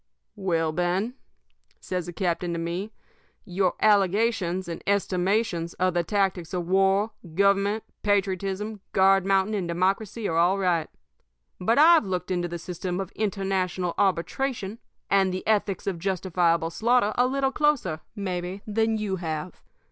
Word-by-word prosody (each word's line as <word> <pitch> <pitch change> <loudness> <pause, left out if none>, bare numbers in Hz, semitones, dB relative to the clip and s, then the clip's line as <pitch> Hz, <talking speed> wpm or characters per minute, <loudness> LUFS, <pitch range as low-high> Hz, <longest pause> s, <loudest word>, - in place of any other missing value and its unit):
"'Well, 165 -6 0
Ben,' 180 +7 -1 0.7
says 180 -2 -4
the - - -4
captain 175 0 -1
to - - -2
me, 170 +5 -3 0.5
'your 185 -1 0
allegations 200 -3 +2
and 170 - -5
estimations 190 -2 0
of 185 -1 +1
the 175 0 +1
tactics 190 -2 -1
of 175 -1 -2
war, 195 +3 +3 0.2
government, 200 +2 +2 0.2
patriotism, 200 +1 -1
guard 195 0 +4
mounting, 195 +2 +2
and 195 -4 -1
democracy 195 +5 -1
are 165 - -1
all 175 +3 +3
right. 175 -4 0 0.7
But 225 +6 +2
I've 315 -5 +6
looked 185 0 -3
into 175 -1 0
the 175 0 -5
system 180 +1 -4
of 195 0 -4
international 190 -4 -1
arbitration 200 +4 -1 0.3
and 195 -1 +4
the 185 +1 -4
ethics 205 -3 0
of 190 -4 -2
justifiable 170 -2 0
slaughter 230 +2 +2
a 245 +1 +3
little 270 0 0
closer, 270 - +1 0.2
maybe, 185 -1 -4
than 220 +1 +1
you 205 -3 -2
have. 165 0 -5
190 Hz, 140 wpm, -26 LUFS, 175-205 Hz, 0.7 s, I've